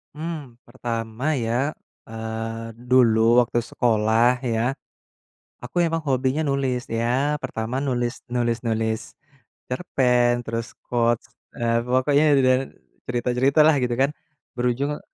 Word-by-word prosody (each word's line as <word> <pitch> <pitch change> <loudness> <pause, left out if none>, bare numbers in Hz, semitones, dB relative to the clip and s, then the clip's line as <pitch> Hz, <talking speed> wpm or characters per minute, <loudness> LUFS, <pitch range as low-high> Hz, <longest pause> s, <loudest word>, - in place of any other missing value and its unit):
Mmm, 155 -6 -6
pertama 120 +3 -3
ya, 125 +5 -1 0.3
eee, 115 0 -5 0.2
dulu 120 -1 +5
waktu 120 0 -1
sekolah, 115 +1 +2
ya. 115 +4 +1 0.9
Aku - - -11
emang 165 0 0
hobinya 130 +2 +1
nulis 135 -3 -1
ya, 125 +6 0
pertama 120 -1 -3
nulis 125 -3 -2
nulis-nulis 115 -2 -1 0.6
cerpen, 125 -4 +1
terus 115 +1 -5
quote, 120 -1 +1 0.3
eee, 115 0 +1
pokoknya 130 +4 +3
dedan 130 -1 +4 0.5
cerita-cerita 125 +4 +1
lah, 155 -1 +5
gitu 120 -1 0
kan. 140 +2 +3 0.5
Berujung 130 +4 0
125 Hz, 105 wpm, -23 LUFS, 115-135 Hz, 0.9 s, dulu